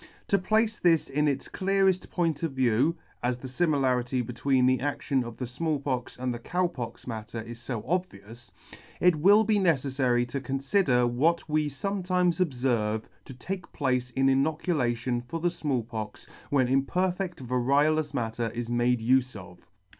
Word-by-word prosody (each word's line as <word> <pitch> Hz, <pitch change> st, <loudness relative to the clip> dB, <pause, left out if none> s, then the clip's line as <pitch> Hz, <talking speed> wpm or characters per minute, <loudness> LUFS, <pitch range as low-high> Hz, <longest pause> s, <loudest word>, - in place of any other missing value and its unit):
— -, -, -32 dB
To 200 Hz, -, +3 dB
place 215 Hz, +3 st, +1 dB
this 165 Hz, -3 st, +3 dB
in 150 Hz, +2 st, +1 dB
its 140 Hz, -2 st, -1 dB
cleareft 195 Hz, -1 st, +1 dB
point 165 Hz, -5 st, -1 dB
of 165 Hz, -4 st, -2 dB
view 130 Hz, +5 st, +2 dB, 0.2 s
(as 125 Hz, 0 st, 0 dB
the 130 Hz, -, -8 dB
limilarity 130 Hz, -4 st, +1 dB
between 125 Hz, +2 st, +1 dB
the 130 Hz, -1 st, +3 dB
adtion 140 Hz, -1 st, -1 dB
of 120 Hz, -1 st, -8 dB
the 125 Hz, -, -3 dB
Small 150 Hz, +5 st, -2 dB
Pox 130 Hz, -3 st, -3 dB
and 125 Hz, 0 st, -2 dB
the 120 Hz, -, -6 dB
Cow 180 Hz, +9 st, 0 dB
Pox 125 Hz, -9 st, -6 dB
matter 115 Hz, -1 st, -6 dB
is 115 Hz, +1 st, -8 dB
fo 115 Hz, -3 st, -4 dB
obvious) 120 Hz, -, -4 dB, 0.5 s
it 180 Hz, -3 st, +4 dB
will 200 Hz, +7 st, +6 dB
be 215 Hz, -1 st, +2 dB
neceflary 130 Hz, -7 st, +1 dB
to 140 Hz, +2 st, -3 dB
conlider 135 Hz, 0 st, +1 dB
what 155 Hz, +9 st, +1 dB
we 155 Hz, -1 st, +1 dB
fometimes 180 Hz, +2 st, 0 dB
obferve 120 Hz, -7 st, -1 dB, 0.2 s
to 135 Hz, -, -9 dB
take 185 Hz, +8 st, -6 dB
place 125 Hz, -3 st, 0 dB
in 135 Hz, +2 st, 0 dB
inocu 150 Hz, +6 st, +2 dB
lation 120 Hz, -2 st, -1 dB
for 165 Hz, +7 st, -5 dB
the 175 Hz, +1 st, +1 dB
Small 135 Hz, -8 st, -1 dB
Pox 110 Hz, -2 st, -7 dB, 0.2 s
when 135 Hz, -3 st, +3 dB
imperfedt 180 Hz, +8 st, 0 dB
variolous 140 Hz, +5 st, +1 dB
matter 115 Hz, -3 st, -2 dB
is 120 Hz, 0 st, -4 dB
made 120 Hz, 0 st, +2 dB
ufe 130 Hz, +2 st, +2 dB
of. 90 Hz, -3 st, -12 dB
135 Hz, 170 wpm, -27 LUFS, 120-165 Hz, 0.5 s, will